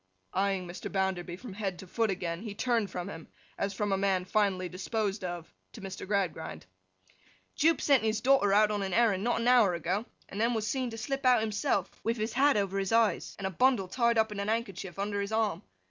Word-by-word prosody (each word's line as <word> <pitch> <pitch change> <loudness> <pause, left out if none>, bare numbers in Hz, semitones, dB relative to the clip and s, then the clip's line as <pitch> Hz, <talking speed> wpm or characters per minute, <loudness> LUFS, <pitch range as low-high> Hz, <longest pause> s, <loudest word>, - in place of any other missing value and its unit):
Eyeing 195 -1 0
Mr. 175 - -7
Bounderby 190 -3 -1
from 240 -1 -9
head 195 -3 -3
to 190 - -10
foot 225 +4 0
again, 175 -2 -3
he 215 -2 -6
turned 230 -3 0
from 180 0 -5
him, 165 -5 -8 0.3
as 200 - -2
from 205 +1 -1
a 195 - +2
man 190 -2 +1
finally 190 -2 +1
disposed 200 +2 -2
of, 175 -2 -6 0.2
to - - -10
Mr. 190 -1 -7
Gradgrind. 185 - -2 0.9
'Jupe 325 +2 +3
sent 280 -3 +4
his 220 0 0
daughter 255 -5 +4
out 210 +1 +5
on 205 -1 -1
an 190 -2 -2
errand 215 -5 +3
not 240 0 +1
an 235 - 0
hour 235 -8 +5
ago, 180 +7 -2 0.2
and 205 - -5
then 235 +1 +2
was 220 -1 -1
seen 260 -2 -1
to 225 - -7
slip 275 +5 -3
out 250 -3 +5
himself, 205 -3 0
with 230 +1 0
his 220 +1 -2
hat 275 0 +4
over 195 -1 0
his 195 -1 -2
eyes, 225 -5 +2
and 195 - -5
a 190 - -1
bundle 240 -1 +2
tied 235 +3 +1
up 220 -1 +2
in 205 - -5
a 200 - -1
handkerchief 200 -5 -3
under 200 0 -1
his 200 +1 -4
arm. 220 -1 0
205 Hz, 225 wpm, -30 LUFS, 190-225 Hz, 0.9 s, out